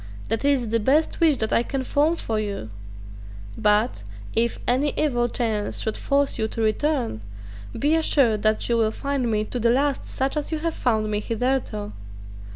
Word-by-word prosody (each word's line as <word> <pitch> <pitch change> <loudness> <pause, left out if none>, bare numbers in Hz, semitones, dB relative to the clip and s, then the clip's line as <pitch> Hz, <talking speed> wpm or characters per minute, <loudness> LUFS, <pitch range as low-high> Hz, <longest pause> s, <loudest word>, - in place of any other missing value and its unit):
That 225 +3 0
is 275 -5 +2
the 230 +1 +1
best 280 +8 +1
wish 320 -5 +4
that 220 -2 0
I - - +4
can 265 +2 -3
form 295 +5 +2
for 225 -9 -2
you. 200 - -4 0.8
But, 210 - +2 0.3
if 235 +1 +1
any 270 +4 +1
evil 240 -5 +1
chance 220 -4 -1
should 220 - -2
force 280 0 0
you 220 - +1
to 225 - -5
return, 235 - 0 0.6
be 295 +2 +2
assured 275 -9 +3
that 215 0 +1
you 235 - +2
will 220 -1 +3
find 275 +1 -2
me 215 -1 +1
to 245 - -4
the 235 0 +2
last 275 +3 +1
such 265 +2 -2
as 300 +1 -3
you 315 - 0
have 330 +1 -2
found 220 -6 0
me 210 - 0
hitherto." 230 - -2
240 Hz, 180 wpm, -24 LUFS, 215-280 Hz, 0.8 s, wish